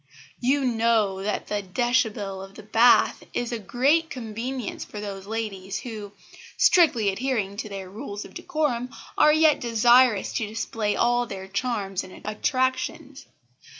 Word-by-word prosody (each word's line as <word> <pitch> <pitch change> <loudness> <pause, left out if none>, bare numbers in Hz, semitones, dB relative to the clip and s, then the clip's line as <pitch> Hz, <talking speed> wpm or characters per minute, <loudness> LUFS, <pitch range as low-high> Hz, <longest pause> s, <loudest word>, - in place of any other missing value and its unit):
You 270 +2 +1
know 225 -5 +1
that 210 +2 -2
the 210 -1 -2
déshabille 205 -2 -1
of 195 0 -12
the 215 - -11
bath 225 +3 +4
is 245 -1 -1
a 235 - -3
great 280 - +2
convenience 240 +1 -5
for 210 - -9
those 200 -2 -6
ladies 205 -3 -4
who, 215 -4 -7 0.4
strictly 260 - +4
adhering 210 -2 -2
to 215 - -5
their 195 -2 -6
rules 205 +1 -7
of - - -13
decorum, 305 -9 -2 0.3
are 300 - +6
yet 310 0 +4
desirous 235 -1 +4
to 220 -5 -1
display 215 -1 -2
all 240 0 +2
their 190 -2 -7
charms 200 -2 -2
and 185 - -13
attractions. 260 +6 -2
225 Hz, 145 wpm, -25 LUFS, 205-255 Hz, 0.4 s, are